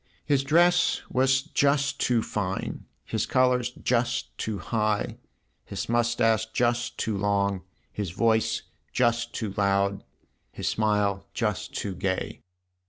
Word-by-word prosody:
His 140 -2 +2
dress 175 +5 +4
was 130 +1 +3
just 140 -2 +1
too 120 -3 +2
fine, 95 -2 -3 0.2
his - - -1
colour 125 0 +3
just 120 -1 -1
too 110 -2 -3
high, 105 +2 -1 0.5
his - - -5
moustache 115 -1 +2
just 120 0 0
too 110 - -1
long, 100 -1 +1 0.3
his 100 -3 -3
voice 110 +5 +1 0.3
just 120 -1 +1
too 105 -4 -3
loud, 100 0 +1 0.5
his - - -5
smile 105 -2 +1
just - - -2
too 100 - -2
gay. 95 +1 -2
115 Hz, 120 wpm, -27 LUFS, 100-125 Hz, 0.5 s, dress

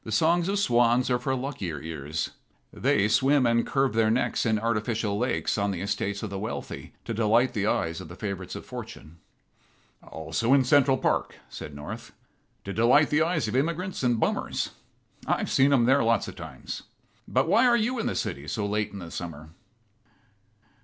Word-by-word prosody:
"The 110 - -7
songs 170 - +2
of 200 - 0
swans 120 -7 +3
are 125 - +2
for 130 +1 -1
luckier 125 - -4
ears. 80 0 -4 0.4
They 100 0 +2
swim 135 +5 +3
and 115 0 +2
curve 135 -1 +1
their 110 -1 +3
necks 120 0 +1
in 110 -1 +2
artificial 110 -1 -1
lakes 120 -1 0
on 100 0 +1
the 90 -3 -3
estates 100 0 -2
of 105 - -4
the 100 - -4
wealthy 110 +3 -6
to 115 - -3
delight 115 +3 +3
the 105 -2 0
eyes 80 -5 0
of - - -9
the 85 - -10
favorites 95 -3 -5
of - - -8
Fortune." 80 +4 -9 0.8
"Also 115 - -1
in 135 - +4
Central 135 0 +4
Park," - - 0
said 75 - -8
North, 75 +1 -8 0.5
"to 100 - -5
delight 125 +7 +4
the 150 +1 +3
eyes 160 -6 +1
of 105 - -3
immigrants 170 +7 -1
and 120 -3 +2
bummers. - - -1 0.6
I've - - 0
seen 135 +1 +4
em 125 -4 +4
there 135 +2 +4
lots 115 -2 +2
of - - -8
times. - - -7 0.5
But - - +1
why 250 +3 +5
are 240 -1 +5
you 240 +2 0
in - - -1
the - - -2
city 70 +2 -3
so 105 +7 -2
late 105 +1 -1
in 100 - -8
the 85 -3 -8
summer?" 80 -3 -7
115 Hz, 185 wpm, -27 LUFS, 100-135 Hz, 0.8 s, why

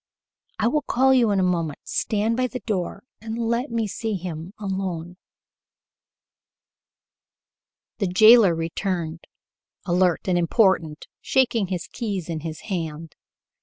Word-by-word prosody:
I 220 - +1
will 300 +5 +1
call 265 0 +3
you 245 -4 +4
in 200 -1 +2
a - - +2
moment. 170 -5 0
Stand 215 +2 -1
by 255 +1 +1
the 250 0 -6
door, 195 -2 -3 0.2
and 225 0 -5
let 235 +3 -1
me 230 -1 -1
see 215 +1 -3
him 175 -1 -6
alone." 185 -4 -4 2.8
The 200 - +1
jailer 215 0 +7
returned, 165 0 -3 0.6
alert 180 -1 +2
and 180 -1 +2
important, 170 -4 +2 0.2
shaking 240 -6 +1
the 180 -1 -2
keys 200 -8 -4
in 165 -2 -3
his 155 0 -6
hand. 165 -5 -5
190 Hz, 130 wpm, -23 LUFS, 170-225 Hz, 2.8 s, jailer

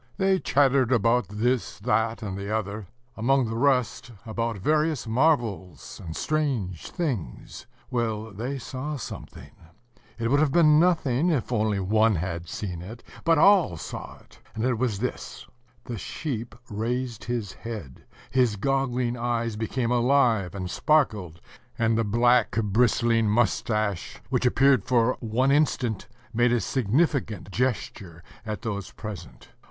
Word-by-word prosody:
They 190 -1 +2
chattered 135 -4 +3
about 115 -2 +3
this, 120 +4 -1
that, 110 +1 0
and 100 -3 -4
the 100 +1 -5
other, 105 -2 -3 0.3
among 130 +3 +2
the 115 - -4
rest 125 -3 +1 0.2
about 115 0 -2
various 150 - +1
marvels 110 - 0
and 80 -2 -6
strange 130 - -2
things. 125 - -4 0.2
Well, 110 -3 -2
they 120 +8 -4
saw 135 +4 -5
something; 130 - -9 0.7
it 115 -1 -1
would 140 - +4
have 150 -2 +3
been 155 -1 +5
nothing 165 -3 +2
if 140 -8 -1
only 110 -3 +1
one 110 +3 +3
had 85 0 -4
seen 90 -5 -5
it, 110 +6 -10 0.2
but 165 -1 +4
all 175 - +5
saw - - -7
it; - - -21 0.2
and 110 +1 -1
it 125 -3 0
was 120 -5 0
this: 125 +5 -5 0.4
the 120 -3 -6
sheep 120 -6 -5
raised 120 +2 -3
his 115 -5 -3
head; 110 - -8 0.3
his 125 -3 +2
goggling 125 +1 0
eyes 115 -2 -1
became 115 +3 -2
alive 120 -6 +2
and 90 -2 -4
sparkled; 105 - +1 0.4
and 115 -1 +2
the 115 - +2
black, 120 +2 +3
bristling 115 +1 +2
moustache, 105 -3 0
which 125 -1 +2
appeared 135 -3 +4
for 125 0 +2
one 125 +4 +1
instant, 130 -7 +1 0.3
made 120 +1 +3
a 120 - +3
significant 125 - 0
gesture 100 -8 -3 0.2
at 105 +1 -4
those 100 -4 -4
present. 105 -6 -9
115 Hz, 140 wpm, -26 LUFS, 105-130 Hz, 0.7 s, been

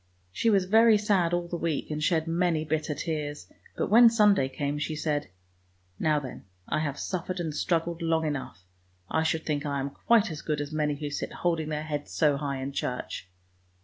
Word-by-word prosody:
She 230 - +1
was 195 -4 +3
very 220 +3 +6
sad 200 -5 +2
all 175 0 -1
the 175 - -3
week, 165 -2 -2
and 150 0 -2
shed 160 -1 +2
many 165 -1 +1
bitter 155 -1 -1
tears, 150 -3 -4 0.3
but - - -1
when 235 +2 +9
Sunday 210 - +4
came, 145 +2 -3
she 155 +1 -2
said, 150 -1 -2 0.4
" - - -39 0.3
Now 155 -1 +2
then, 130 -7 -9 0.2
I - - 0
have 145 -2 -2
suffered 185 +2 -3
and 160 -3 -2
struggled 170 +2 -1
long 165 -1 +1
enough; 135 - -4 0.5
I 160 - +2
should 160 0 0
think 145 -2 -1
I 140 -2 -2
am 140 +1 -3
quite 225 +4 +2
as 155 - -6
good 150 -2 -2
as 145 +1 -4
many 150 -1 0
who 145 0 -5
sit - - -4
holding 165 -3 -1
their 150 0 -2
heads 150 -2 -5
so 150 -3 +3
high 140 -2 -3
in 135 - -4
church! 125 -8 -4
155 Hz, 205 wpm, -28 LUFS, 145-175 Hz, 0.5 s, when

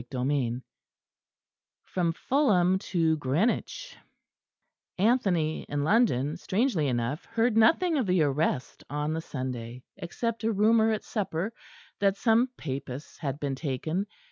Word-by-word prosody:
CHAPTER 125 +1 -3
IX 125 -5 0 1.3
FROM 170 -3 -1
FULHAM 190 - +2
TO 165 -5 +1
GREENWICH 185 - -1 1.0
Anthony 185 -7 +2
in 145 0 -1
London, 155 - +2
strangely 190 - 0
enough, 125 +4 -2
heard 230 0 +1
nothing 320 +8 +4
of 240 - -1
the 180 -3 +3
arrest 140 -2 -1
on 150 +2 -2
the 160 - -2
Sunday, 125 -4 -6
except 225 +5 -3
a 225 - +2
rumour 220 +2 +4
at 215 - -2
supper 200 -1 -3 0.5
that 200 -1 +2
some 235 +3 +3
Papists 135 0 -6
had 140 -3 -3
been 140 -2 -2
taken. 155 +7 -2
170 Hz, 125 wpm, -28 LUFS, 140-220 Hz, 1.3 s, nothing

